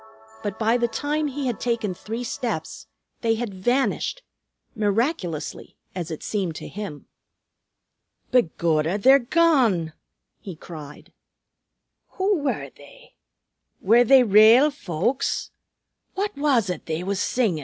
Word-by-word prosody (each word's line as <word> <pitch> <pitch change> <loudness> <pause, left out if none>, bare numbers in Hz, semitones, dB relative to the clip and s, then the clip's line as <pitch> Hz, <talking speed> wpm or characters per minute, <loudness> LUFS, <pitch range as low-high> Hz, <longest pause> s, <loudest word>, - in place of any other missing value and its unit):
But 205 -3 -4
by 225 +2 +2
the 240 -1 +1
time 295 +6 -2
he 280 0 -4
had 245 -3 -2
taken 230 -5 -1
three 225 +6 -6
steps 160 - -4 0.3
they 225 -1 +2
had 225 -3 -4
vanished, 255 - -1 0.5
miraculously, 205 - -2 0.2
as 175 -3 -5
it 160 - -6
seemed 190 -6 -2
to - - -7
him. 200 -8 -7 1.3
"Begorra, 170 -6 +1
they're 265 +7 +6
gone!" 245 - +2 0.5
he 190 -4 -8
cried. 155 -3 -11 1.0
"Who 385 -1 +1
were 285 -2 -3
they? - - -17 0.7
Were 230 +5 +5
they 260 +1 +6
rale 225 +7 +6
folks? 235 - -2 0.6
What 405 +1 -2
was 270 -9 +1
it 180 - -7
they 160 +2 -2
was 195 0 -2
singin'?" 210 -8 0
225 Hz, 120 wpm, -23 LUFS, 180-265 Hz, 1.3 s, they're